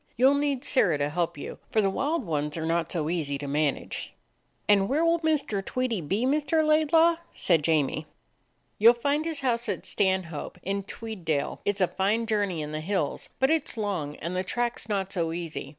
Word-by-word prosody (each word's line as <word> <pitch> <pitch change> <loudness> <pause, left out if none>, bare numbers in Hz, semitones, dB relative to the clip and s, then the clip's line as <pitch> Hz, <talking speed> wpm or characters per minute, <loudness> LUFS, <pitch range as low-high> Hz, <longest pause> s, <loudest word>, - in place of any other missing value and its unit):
You 255 +3 +6
'll - - +3
need 285 -2 0
Sirrah 175 - +2
to 145 0 0
help 170 -1 -1
you, - - -7
for 220 - +1
the 200 - +3
wild 285 +5 -1
ones 150 -2 -2
are 160 - -2
not 165 0 0
so 160 -4 -1
easy 155 -4 -1
to 140 0 -6
man 145 0 +1
age." - - -7 0.5
"And 200 -1 +4
where 310 +5 +2
will 335 0 +3
Mr. 300 -11 0
Tweedie 245 -3 -1
be, 195 +10 0
Mr. 300 +3 +2
Laid 310 0 +3
law?" 330 0 +5
said 170 -4 +2
Jamie. 155 0 +1 0.7
"You 220 +3 +8
'll - - +7
find 285 +6 0
his 320 -3 -1
house 240 -3 0
at - - -3
Stanhope, 185 -5 -1
in 200 +1 -1
Tweeddale. 180 -11 -3
It 205 -1 +1
's - - -2
a 185 - +5
fine 200 +6 0
journey 205 -7 0
in 150 - -6
the 155 0 -3
hills, 180 -3 -2
but 265 +2 +3
it 320 -3 +1
's - - -6
long, 180 -9 -2
and 170 +3 -5
the 185 - 0
track 240 +5 -1
is 220 - -7
not 195 -2 -1
so 165 -3 -1
easy. 165 -5 -5
195 Hz, 215 wpm, -27 LUFS, 165-255 Hz, 0.7 s, You